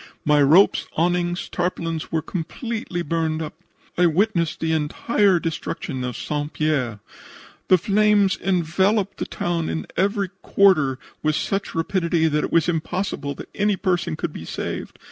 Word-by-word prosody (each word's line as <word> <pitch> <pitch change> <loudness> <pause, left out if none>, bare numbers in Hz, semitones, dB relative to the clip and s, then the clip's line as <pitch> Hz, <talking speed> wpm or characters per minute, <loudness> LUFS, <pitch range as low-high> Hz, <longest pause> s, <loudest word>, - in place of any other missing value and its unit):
My 150 -1 +4
ropes, 160 +8 +5
awnings, 175 +1 0
tarpaulins 165 -3 -3
were 160 -1 0
completely 190 +1 -4
burned 160 0 -1
up. 155 -1 -5 0.5
"I 180 - +6
witnessed 170 -1 +1
the 160 0 0
entire 175 +5 +2
destruction 165 -4 -4
of 125 -1 -4
St. 150 0 -3
Pierre. 140 -8 0 0.7
The 185 - +6
flames 205 +1 +3
enveloped 190 +3 +1
the - - -3
town 170 -2 -2
in 160 - -3
every 200 0 +1
quarter 155 -10 +3 0.2
with 155 -1 +1
such 195 +4 -2
rapidity 170 -1 +1
that 150 -1 +1
it - - -3
was 165 -1 +3
impossible 165 -3 -2
that - - -10
any 205 0 +1
person 180 -5 0
could 160 0 -4
be - - -7
saved. - - -5
170 Hz, 145 wpm, -23 LUFS, 155-190 Hz, 0.7 s, I